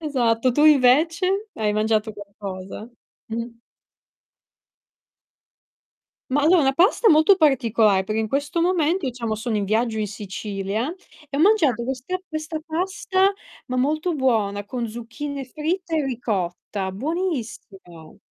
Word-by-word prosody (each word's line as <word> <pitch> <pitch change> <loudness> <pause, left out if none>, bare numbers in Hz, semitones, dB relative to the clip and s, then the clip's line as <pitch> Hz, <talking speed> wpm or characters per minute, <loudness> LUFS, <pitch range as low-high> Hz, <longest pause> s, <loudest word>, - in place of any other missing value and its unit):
Esatto, 255 -5 +1
tu 295 +5 +3
invece? 330 - +4
Hai 210 -1 0
mangiato 215 0 0
qualcosa? 200 0 -8 0.4
Mh. 230 +1 -3 2.8
Ma 285 +2 +2
allora 335 +2 +5
una 270 -1 +2
pasta 390 - +4
molto 315 +5 +6
particolare 230 - +3
perché 215 +3 -2
in 220 -1 -1
questo 285 +5 -1
momento 345 -1 +1
diciamo 235 -3 -3
sono 220 +1 -2
in 205 - 0
viaggio 220 +3 0
in 215 - -1
Sicilia 205 - -4 0.4
e 280 - -3
ho - - +2
mangiato 315 - +3
questa 265 +8 -3
questa 310 0 -4
pasta, 375 +3 +1 0.4
ma 255 - -2
molto 310 +7 0
buona, 215 -7 0
con 245 -1 -3
zucchine 240 +5 -6
fritte 325 +5 -2
e 305 - +1
ricotta, 200 -5 -3
buonissima. 220 - -5
255 Hz, 125 wpm, -23 LUFS, 215-315 Hz, 2.8 s, molto